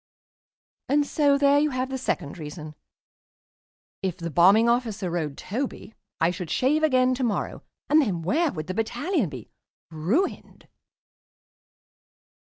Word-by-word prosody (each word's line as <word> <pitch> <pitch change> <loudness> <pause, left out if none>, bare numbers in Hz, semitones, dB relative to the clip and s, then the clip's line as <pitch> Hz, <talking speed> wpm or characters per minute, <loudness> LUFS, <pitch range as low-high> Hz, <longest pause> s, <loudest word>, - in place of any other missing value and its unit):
And 290 +1 +3
so 285 -1 +2
there 280 0 +4
you 300 +1 +2
have 255 -1 -2
the 265 - -2
second 160 - -3
reason. 150 0 -8 1.3
If 185 -2 -2
the 170 -2 -5
Bombing 195 +8 +5
Officer 225 -6 0
rode 155 -5 -3
Toby, 245 0 -5 0.3
I 165 +2 +3
should 180 -2 -6
shave 280 - +2
again 255 -4 +3
to 255 +1 -2
morrow, 225 -4 -2 0.3
and 310 +1 +5
then 185 - -2
where 305 - +1
would 155 -2 -5
the 185 - -4
Battalion 235 - -1
be? 125 -6 -10 0.4
Ruined. 190 - -2
225 Hz, 135 wpm, -25 LUFS, 170-280 Hz, 1.3 s, Bombing